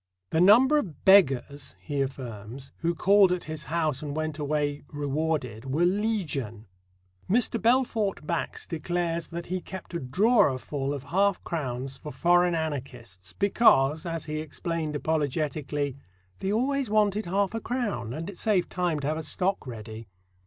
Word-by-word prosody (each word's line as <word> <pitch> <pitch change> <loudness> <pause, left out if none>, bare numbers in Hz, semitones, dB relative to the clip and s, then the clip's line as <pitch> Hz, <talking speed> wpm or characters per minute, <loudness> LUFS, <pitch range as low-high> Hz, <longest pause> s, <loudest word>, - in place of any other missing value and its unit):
"The 160 - +2
number 250 +10 +6
of 175 - -7
'beggars,'" 140 -7 +4
he 145 -2 -3
affirms, 130 -1 -6
"who 170 +1 -1
called 195 +1 +5
at 180 -1 -1
his 155 -2 -7
house 155 -3 -1
and 145 -1 -5
went 155 -1 -3
away 145 0 -1
rewarded 145 -5 -2
were 145 +6 +1
legion." 175 - -1 0.6
Mr. 230 +2 +2
Belfort 225 -7 +1
Bax 170 +1 -2
declares 170 +1 -2
that 170 0 -6
he 185 +1 -3
kept 190 -1 -9
a 170 - -1
drawerful 140 - +2
of 140 -2 -4
half 195 +6 +1
crowns 135 -4 -4
for 150 - -8
foreign 175 +5 +3
anarchists, 125 - -5
because, 160 - +3
as 165 -1 -4
he 155 0 -3
explained 155 0 -3
apologetically: 145 -2 -1 0.4
"They 190 - -1
always 260 +3 0
wanted 210 -1 +2
half 195 +2 0
a 225 - -3
crown, 235 - -2
and 160 +6 -5
it 200 -3 -8
saved 200 -5 +1
time 175 -4 0
to 140 - -2
have 155 +1 0
a - - -3
stock 180 +1 -1
ready." 110 -2 -8
160 Hz, 150 wpm, -27 LUFS, 140-190 Hz, 0.6 s, number